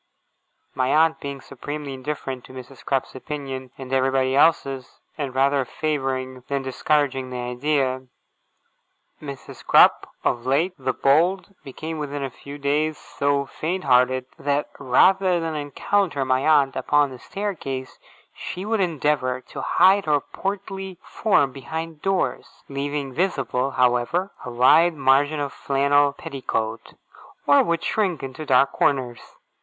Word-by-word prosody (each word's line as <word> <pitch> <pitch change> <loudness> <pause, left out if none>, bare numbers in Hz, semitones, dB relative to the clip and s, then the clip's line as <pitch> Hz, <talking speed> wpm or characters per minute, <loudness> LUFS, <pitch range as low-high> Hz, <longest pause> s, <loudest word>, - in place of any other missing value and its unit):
My 130 -1 0
aunt 160 +3 +3
being 140 -2 -6
supremely 145 +2 -6
indifferent 135 -1 -5
to - - -14
Mrs. 130 0 -11
Crupp's 135 -2 -1
opinion 135 -1 -6
and 135 -1 -7
everybody 130 0 +2
else's, 135 -4 +2 0.2
and 140 -4 -4
rather 135 +1 +3
favouring 130 -3 -3
than 140 -1 -2
discouraging 135 0 0
the 125 - -5
idea, 130 +1 -1 1.1
Mrs. 140 -3 -9
Crupp, - - +5
of 120 - 0
late 145 +8 +1
the 130 - 0
bold, 175 +8 +2
became 155 +4 -6
within 145 -1 -4
a 135 - -4
few 140 +4 -10
days 150 +2 0
so 140 0 -1
faint 180 +7 -4
hearted, 130 0 +3
that 145 +1 -1
rather 185 +7 +4
than 165 -1 -3
encounter 150 +1 -1
my 130 +2 +1
aunt 145 -3 +4
upon 145 +2 +2
the 130 - -10
staircase, 160 -11 -5 0.3
she 185 +2 -6
would 220 0 0
endeavour 150 -7 0
to 130 - -9
hide 190 +2 +4
her 150 -1 +3
portly 195 +2 -5
form 145 - +1
behind 160 +4 -6
doors 190 -10 -2
leaving 140 0 -3
visible, 140 -6 0
however, 125 +9 +1
a - - -6
wide 150 +8 +5
margin 140 +2 +3
of 140 -1 -3
flannel 140 +1 +2
petticoat 115 -5 -4 0.5
or 145 0 +6
would 170 0 -1
shrink 190 -9 0
into 135 +3 -7
dark 135 +1 +4
corners. 125 -4 0
140 Hz, 135 wpm, -23 LUFS, 130-155 Hz, 1.1 s, or